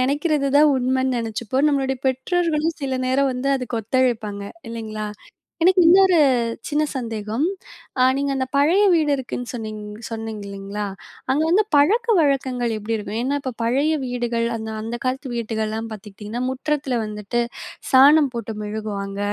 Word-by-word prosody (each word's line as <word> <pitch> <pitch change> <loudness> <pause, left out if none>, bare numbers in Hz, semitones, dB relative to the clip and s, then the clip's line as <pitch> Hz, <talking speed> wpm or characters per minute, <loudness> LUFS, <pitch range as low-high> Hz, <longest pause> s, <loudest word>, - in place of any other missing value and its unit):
நெனைக்கிறது 285 +2 +1
தான் 300 -1 +6
உண்மன்னு 260 0 +1
நெனைச்சுப்போம். 235 +5 -1
நம்மளுடைய 270 -2 0
பெற்றோர்களும் 325 +3 0
சில 270 -1 -2
நேரம் 270 +1 +2
வந்து 255 +2 -1
அதுக்கு 245 -2 -3
ஒத்துழைப்பாங்க. 220 -4 0 0.3
இல்லைங்களா, 215 -2 -5 0.5
எனக்கு 370 +1 +5
இன்னொரு 370 0 +6 0.5
சின்ன 295 +1 +1
சந்தேகம். 225 0 -2 0.6
அ - - +6
நீங்க 280 0 -1
அந்த 260 0 -1
பழைய 330 +8 +4
வீடு 310 -3 +3
இருக்குன்னு 245 -1 -5
சொன்னிங் 215 -3 -5 0.3
சொன்னிங்க 225 -2 -5
இல்லைங்களா, 200 +1 -5 0.5
அங்க 290 +4 +2
வந்து 410 +5 +4
பழக்க 430 +12 +4
வழக்கங்கள் 255 -6 +1
எப்டி 215 +2 -3
இருக்கும்? 210 +1 -5
ஏன்னா, 280 +3 0
இப்ப 260 -3 -3
பழைய 275 +7 +2
வீடுகள், 240 -1 -1
அந்த 220 0 -5
அந்த 230 +2 -4
காலத்து 260 +1 -2
வீடுகள்லாம் 220 0 -3
பாத்துக்கிட்டீங்கன்னா, 210 +3 -7
முற்றத்தில 270 -2 -1
வந்துட்டு 210 +2 -3 0.5
சாணம் 280 +2 +6
போட்டு 225 -1 -4
மொழுகுவாங்க. 205 -2 -4
250 Hz, 140 wpm, -22 LUFS, 220-280 Hz, 0.6 s, தான்